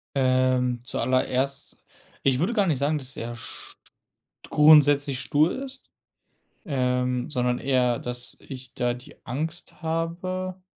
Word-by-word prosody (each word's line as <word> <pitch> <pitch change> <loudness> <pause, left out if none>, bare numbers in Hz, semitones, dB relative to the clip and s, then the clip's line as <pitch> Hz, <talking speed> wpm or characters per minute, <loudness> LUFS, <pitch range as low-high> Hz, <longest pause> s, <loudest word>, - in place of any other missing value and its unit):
Ähm, 130 -2 +2
zuallererst, 130 +2 -1 0.5
ich 130 -2 +3
würde 185 +10 +1
gar 205 -5 +2
nicht 155 - +2
sagen, 145 +3 +1
dass 135 -2 -5
er 120 +1 -5
st 120 - -9 0.7
grundsätzlich 145 -3 +5
stur 150 +5 +2
ist, 265 0 -12 0.8
ähm, 125 -1 0
sondern 125 -3 0
eher, 125 -3 +1
dass 120 0 -3
ich 130 -1 -9
da 120 -1 0
die 125 +5 -12
Angst 160 +9 -4
habe, 180 +3 -3
135 Hz, 125 wpm, -25 LUFS, 125-155 Hz, 0.8 s, grundsätzlich